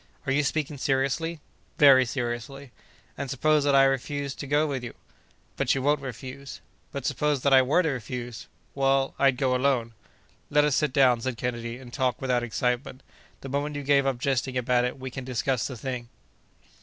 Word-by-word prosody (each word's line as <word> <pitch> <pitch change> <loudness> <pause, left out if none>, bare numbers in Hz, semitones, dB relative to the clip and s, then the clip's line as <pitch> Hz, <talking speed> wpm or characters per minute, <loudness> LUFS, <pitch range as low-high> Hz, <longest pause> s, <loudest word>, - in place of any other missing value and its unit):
"Are 135 - -1
you 140 +2 +3
speaking 150 -1 -2
seriously?" 140 +5 -1 0.4
"Very 130 -3 +7
seriously." 125 +2 -4 0.5
"And 140 -2 -3
suppose 150 +3 +2
that 140 -1 +3
I 135 - +7
refuse 140 +1 -1
to 140 - -7
go 145 +2 +2
with 135 -4 -3
you?" 120 - -7 0.6
"But - - +2
you 135 - -2
won't 145 0 +2
refuse." 130 +2 -8 0.3
"But, 140 -2 -5
suppose 150 -2 0
that 140 - +3
I 130 - +8
were 145 +8 +2
to 160 - +1
refuse?" 120 -3 -5 0.3
"Well, 135 0 +1
I'd 135 -2 +3
go 130 -2 +1
alone." 125 -3 +1 0.6
"Let 150 0 +4
us 150 -2 +2
sit 150 -3 +1
down," 125 -3 +4
said 130 -1 -3
Kennedy, 120 -1 -4
"and 125 -2 -13
talk 130 -4 0
without 125 -2 0
excitement. 125 +3 -2 0.4
The 135 - -7
moment 145 +2 -2
you 145 - -4
give 140 0 +3
up 135 -2 0
jesting 130 0 -1
about 125 0 +2
it, 125 - -3
we 130 0 -6
can 130 - -6
discuss 125 -1 -1
the 130 - -7
thing." 125 -1 -5
135 Hz, 190 wpm, -26 LUFS, 125-140 Hz, 0.6 s, I